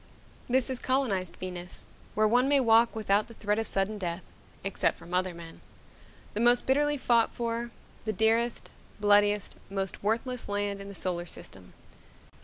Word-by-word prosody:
This 260 +1 +2
is 255 - -1
colonized 235 -9 0
Venus, 180 -1 -5 0.3
where 215 0 +4
one 245 +4 +3
may 285 0 +4
walk 230 -2 +4
without 210 -1 +1
the 230 - -13
threat 210 0 0
of 225 - -2
sudden 200 +2 0
death 175 -1 -3 0.4
except 195 0 0
from 175 - -12
other 180 -1 0
men 165 -1 -11 0.7
the 205 - -2
most 240 +1 +4
bitterly 295 +2 +2
fought 235 -3 +2
for, 235 0 -2 0.4
the 215 - 0
dearest, 225 +3 +1 0.3
bloodiest, 205 0 +3
most 195 -1 -3
worthless 235 +4 -1
land 205 0 -1
in 200 - -8
the 200 - -9
solar 175 -2 -2
system. 95 - -11
210 Hz, 160 wpm, -29 LUFS, 195-235 Hz, 0.7 s, where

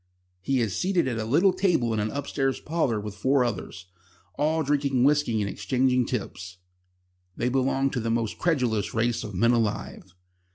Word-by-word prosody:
He 130 +7 0
is 105 -5 -1
seated 180 -5 +1
at 120 -3 -2
a 110 - -2
little 170 - +3
table 175 - +1
in 110 - -1
an 105 +1 -1
upstairs 135 0 -2
parlour 150 -9 -1
with 105 0 -6
four 130 +6 +2
others, 95 -4 -5 0.5
all 155 +2 0
drinking 140 -3 +1
whisky 145 -5 +2
and 100 - -1
exchanging 125 +3 +1
tips. 95 -6 -5 0.8
They 125 - 0
belong 135 +1 +1
to 125 - -2
the 115 0 -2
most 115 -1 -1
credulous 120 - 0
race 115 +1 0
of 105 - -7
men 115 +6 +3
alive. 105 -5 -2
125 Hz, 170 wpm, -26 LUFS, 110-140 Hz, 0.8 s, little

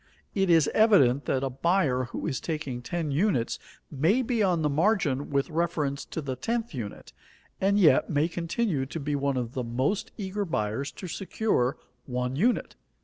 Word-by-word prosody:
It 195 -2 +1
is 165 -4 +5
evident 145 - +5
that 130 - 0
a 135 - 0
buyer 135 -2 +1
who 120 - -6
is 140 -6 -1
taking 150 -7 -4
ten 160 +4 -3
units 145 - +1 0.3
may 165 - +2
be 235 -2 0
on 180 -5 +2
the - - +3
margin 150 -4 +1
with 140 +3 0
reference 155 -4 -1
to 160 - -5
the 130 -2 -3
tenth 230 - -2
unit, 115 -7 -7 0.5
and 200 +1 +3
yet 170 -6 +5
may 150 +1 +2
continue 170 - -1
to 165 - -5
be 145 0 -2
one 140 -1 0
of 120 -1 -3
the 130 - -2
most 130 - -1
eager 200 0 -3
buyers 135 - -2
to 185 - -8
secure 175 - 0 0.3
one 125 0 -2
unit. 230 - +1
150 Hz, 175 wpm, -27 LUFS, 130-190 Hz, 0.5 s, is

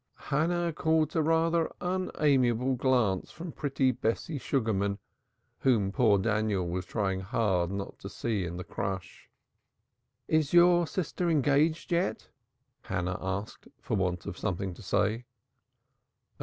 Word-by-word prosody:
Hannah 170 +3 +1
caught 160 0 +1
a 160 - +2
rather 165 +1 +2
unamiable 135 -9 +1
glance 125 -7 +1
from 170 0 -8
pretty 135 -3 +1
Bessie 125 +6 -2
Sugarman, 105 -7 0 0.6
whom 110 -7 +2
poor 110 -3 +4
Daniel 105 -3 0
was 90 +1 -3
trying 95 -4 -1
hard 95 -3 0
not 100 0 -5
to - - -7
see 110 -5 -2
in 90 0 -5
the 90 - -5
crush. 95 -2 -5 1.0
"Is 155 -2 +1
your 175 -1 +6
sister 175 0 -2
engaged 150 +2 +2
yet?" 175 +2 0 0.5
Hannah 90 +1 -3
asked, 95 +3 -4
for - - -2
want 90 -2 -1
of - - -6
something 90 +1 -2
to - - -13
say. 115 +4 0
120 Hz, 130 wpm, -29 LUFS, 95-160 Hz, 1.0 s, your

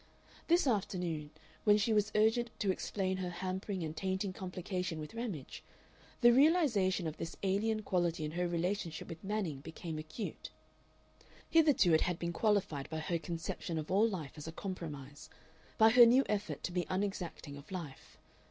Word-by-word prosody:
This 340 0 +4
afternoon, 180 - -1 0.3
when 210 -1 +6
she 220 +2 +1
was 210 0 +2
urgent 225 +3 +3
to 200 -3 +2
explain 190 0 -2
her 185 -1 -3
hampering 185 +1 -3
and 155 0 -4
tainting 190 +2 -2
complication 180 -3 -4
with 150 -1 -7
Ramage, 220 - -5 0.6
the 240 -1 +8
realization 250 - +4
of 160 -1 -4
this 165 - -5
alien 215 +3 +1
quality 175 -5 0
in 150 - -4
her 175 +2 -1
relationship 175 0 -2
with 165 0 -8
Manning 195 -8 -2
became 160 +2 -6
acute. 155 +8 -6 1.0
Hitherto 295 - +5
it 160 - +5
had 180 -2 0
been 170 0 -3
qualified 200 -8 0
by 160 - -4
her 165 +2 -1
conception 165 +1 -4
of 155 -1 -4
all 210 +4 +4
life 165 -9 -5
as 150 - -7
a - - -4
compromise, 155 -5 -7 0.5
by 220 0 +7
her 240 0 +9
new 255 +3 +6
effort 205 -1 -2
to - - -2
be 175 -1 -1
unexacting 185 -6 -3
of 145 +6 -12
life. 165 -8 -7
185 Hz, 165 wpm, -34 LUFS, 165-210 Hz, 1.0 s, her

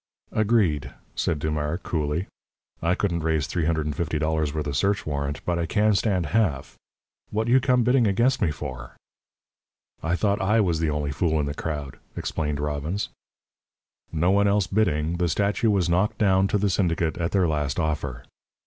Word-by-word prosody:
"Agreed!" 105 -9 +1 0.2
said 80 - 0
Dumars, 75 +1 -2
coolly. 75 +2 -1 0.6
"I 85 +2 +2
couldn't 90 -5 0
raise 80 -2 +1
three 85 -3 -1
hundred 80 -1 0
and 75 -2 -2
fifty 80 -1 -1
dollars 80 -1 0
with 75 0 -3
a 70 - -3
search 100 +10 +1
warrant, 70 -1 -3
but 85 -1 0
I 85 - -1
can 105 +3 +3
stand 95 -3 +1
half. 95 -13 0 0.5
What 110 +2 -1
you 125 +3 +5
come 125 -1 +2
bidding 125 -1 +3
against 120 +6 +2
me - - +3
for?" 75 -4 -7 1.0
"I 85 +3 0
thought 100 +2 +1
I 105 +4 +3
was 85 -6 +1
the 80 -1 +1
only 75 -1 -1
fool 80 +2 +1
in 75 - 0
the 70 - -3
crowd," 75 -3 -5 0.2
explained 75 -2 -2
Robbins. 75 +6 -2 1.0
No 85 +3 +2
one 100 +1 +4
else 100 -1 +3
bidding, 85 -5 0
the 85 -1 +1
statue 100 - +1
was 100 -4 +2
knocked 90 +5 +1
down 95 -2 +3
to 100 - +1
the 100 -1 +1
syndicate 85 -3 0
at 85 0 0
their 95 -3 +3
last 75 -2 -1
offer. 70 -6 -2
85 Hz, 180 wpm, -25 LUFS, 75-100 Hz, 1.0 s, you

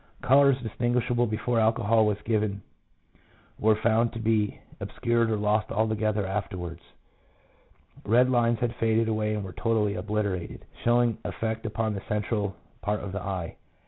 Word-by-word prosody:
Colours 140 0 +5
distinguishable 120 +1 0
before 115 +2 0
alcohol 110 0 +3
was 105 -1 0
given 105 -3 -1 1.0
were 110 0 +4
found 115 +2 +2
to - - -7
be 110 -2 0 0.2
obscured 115 -1 0
or 110 - +1
lost 105 +1 +1
altogether 110 -1 0
afterwards. 90 -3 -4 1.2
1 - - -5
Red 125 +2 +5
lines 120 -1 +3
had 120 -1 -1
faded 115 0 +2
away 110 -1 0
and 105 - -3
were 95 -2 -7
totally 110 -3 +1
obliter 105 -2 -1
ated, - - -10 0.2
showing 120 -1 +3
effect 110 0 -3
upon 110 0 -1
the 100 - -4
central 105 -1 -1 0.3
part 105 0 -1
of 95 - -6
the 100 - -4
eye. 95 -4 -4
110 Hz, 150 wpm, -27 LUFS, 105-115 Hz, 1.2 s, Colours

